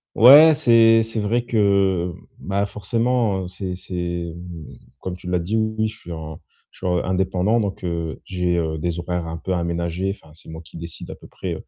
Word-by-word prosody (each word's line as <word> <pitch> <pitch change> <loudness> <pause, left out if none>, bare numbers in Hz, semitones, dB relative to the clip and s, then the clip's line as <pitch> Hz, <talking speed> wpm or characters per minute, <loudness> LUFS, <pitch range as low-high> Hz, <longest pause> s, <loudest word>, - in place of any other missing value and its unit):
Ouais, 145 +7 +9
c'est 115 -5 +5
c'est 115 0 -4
vrai 110 +3 0
que, 100 -6 +1 0.2
bah, 100 +1 -1
forcément, 115 0 0
heu, 90 - -6
c'est 95 -1 -5
c'est 85 -2 -4
mmh, 85 -3 -10 0.2
comme 90 -1 -5
tu 90 0 -10
l'as 90 -1 +1
dit, 95 +7 -2
oui, 110 0 0
je 110 +1 -10
suis 85 - -9
en 80 -1 -7 0.3
je - - -21
suis 95 - -5
en 90 -1 +1
indépendant 95 +3 +1
donc, 100 -2 -3
heu, 85 -3 -3
j'ai, 90 -1 -1
heu, 80 -2 -1
des 85 +2 -2
horaires 90 -1 -3
un 80 0 -5
peu 95 - -3
aménagés, 85 +2 -2
enfin, 80 - -20
c'est 85 - -16
moi 80 0 -8
qui 80 - -14
décide 85 0 -8
à - - -7
peu - - -15
près, - - -5
90 Hz, 205 wpm, -22 LUFS, 85-110 Hz, 0.3 s, Ouais